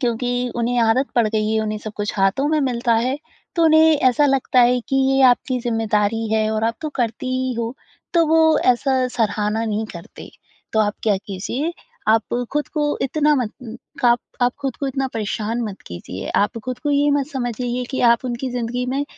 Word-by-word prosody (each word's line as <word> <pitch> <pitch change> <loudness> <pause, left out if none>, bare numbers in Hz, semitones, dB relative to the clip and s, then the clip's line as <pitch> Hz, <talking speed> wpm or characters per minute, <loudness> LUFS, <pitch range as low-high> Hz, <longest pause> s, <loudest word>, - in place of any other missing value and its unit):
क्योंकि 245 0 -1
उन्हें 240 +1 0
आदत 230 +4 +3
पड़ 235 -2 +3
गई 215 0 0
है 220 - +2
उन्हें 215 0 -2
सब 215 0 -7
कुछ 205 0 -2
हाथों 195 +9 +2
में 310 -1 +2
मिलता 240 -3 +1
है, 255 +5 0 0.4
तो 335 - +3
उन्हें 315 0 +6
ऐसा 290 +4 +3
लगता 265 -2 +2
है 245 +1 +4
कि 270 - +1
ये 270 0 +2
आपकी 250 +1 +1
ज़िम्मेदारी 225 -2 0
है 220 0 +2
और 220 0 -1
आप 230 +1 0
तो 310 - -2
करती 235 0 -2
ही 255 0 -1
हो, 235 +2 -3 0.4
तो 335 -1 +5
वो 320 0 +4
ऐसा 255 +1 +2
सराहना 215 -1 -1
नहीं 220 0 -1
करते। 170 -1 -11 0.4
तो 220 - +3
आप 210 -1 +1
क्या 210 -3 +3
कीजिए, 235 - -3 0.4
आप 225 +1 +2 0.2
खुद 295 0 -1
को 295 -2 -1
इतना 295 +2 +2
मत 235 -1 -5 0.3
आप 240 0 +4 0.2
आप 245 0 +3
ख़ुद 270 - -2
को 280 - -3
इतना 270 0 -1
परेशान 220 +2 -2
मत 205 -3 -6
कीजिए, 85 +2 -7
आप 210 +3 +1
ख़ुद 255 -1 -4
को 295 - -2
ये 290 0 +3
मत 285 -1 +1
समझिए 245 -1 -2
कि 265 - -2
आप 235 - -2
उनकी 250 +1 -3
ज़िंदगी 245 +1 -3
में 275 +3 -1
245 Hz, 195 wpm, -21 LUFS, 220-270 Hz, 0.4 s, उन्हें